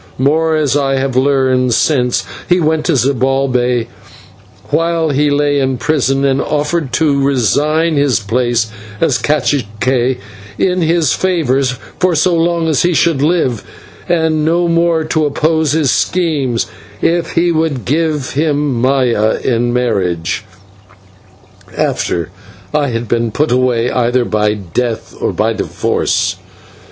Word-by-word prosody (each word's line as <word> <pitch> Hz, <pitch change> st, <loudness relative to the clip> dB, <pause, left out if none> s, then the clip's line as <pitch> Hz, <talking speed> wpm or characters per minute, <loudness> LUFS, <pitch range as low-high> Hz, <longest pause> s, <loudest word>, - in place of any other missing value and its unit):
More, 160 Hz, +4 st, +2 dB
as 150 Hz, -3 st, +1 dB
I 135 Hz, -2 st, +1 dB
have 135 Hz, -1 st, -1 dB
learned 130 Hz, -2 st, +2 dB
since, 125 Hz, -1 st, +1 dB, 0.2 s
he 180 Hz, 0 st, +4 dB
went 160 Hz, -1 st, 0 dB
to 165 Hz, -, +2 dB
Zibalbay 125 Hz, -2 st, +1 dB, 0.9 s
while 165 Hz, -1 st, +1 dB
he 145 Hz, +1 st, +2 dB
lay 145 Hz, 0 st, +1 dB
in 130 Hz, -1 st, 0 dB
prison, 135 Hz, -1 st, 0 dB
and 135 Hz, 0 st, +1 dB
offered 150 Hz, -1 st, -1 dB
to 145 Hz, -1 st, +2 dB
resign 145 Hz, -, +1 dB
his 140 Hz, -4 st, +2 dB
place 115 Hz, +1 st, -1 dB, 0.3 s
as 140 Hz, -7 st, +1 dB
/cacique/ 130 Hz, -3 st, 0 dB, 0.4 s
in 185 Hz, -1 st, +1 dB
his 165 Hz, -3 st, +2 dB
favour 165 Hz, -8 st, +1 dB, 0.4 s
for 180 Hz, -2 st, +2 dB
so 175 Hz, +4 st, +2 dB
long 170 Hz, 0 st, +1 dB
as 155 Hz, -5 st, +2 dB
he 175 Hz, -1 st, +1 dB
should 155 Hz, -1 st, +2 dB
live, 145 Hz, -8 st, +1 dB, 0.5 s
and 160 Hz, -3 st, +1 dB
no 170 Hz, +2 st, +1 dB
more 170 Hz, -1 st, +2 dB
to 155 Hz, 0 st, 0 dB
oppose 155 Hz, +1 st, +1 dB
his 150 Hz, -5 st, +2 dB
schemes, 150 Hz, -9 st, 0 dB, 0.4 s
if 170 Hz, 0 st, 0 dB
he 170 Hz, +1 st, +2 dB
would 155 Hz, -7 st, -1 dB
give 150 Hz, -1 st, -1 dB
him 145 Hz, -4 st, 0 dB
Maya 125 Hz, -5 st, +2 dB
in 120 Hz, -1 st, 0 dB
marriage 95 Hz, -9 st, -1 dB, 1.3 s
after 85 Hz, 0 st, -1 dB, 0.4 s
I 150 Hz, -1 st, +1 dB
had 115 Hz, -2 st, -3 dB
been 115 Hz, +1 st, 0 dB
put 150 Hz, +6 st, 0 dB
away 125 Hz, -1 st, +1 dB
either 120 Hz, 0 st, +1 dB
by 105 Hz, -1 st, 0 dB
death 110 Hz, +5 st, -3 dB
or -, -, 0 dB
by -, -, 0 dB
divorce. -, -, -1 dB
140 Hz, 135 wpm, -14 LUFS, 125-160 Hz, 1.3 s, he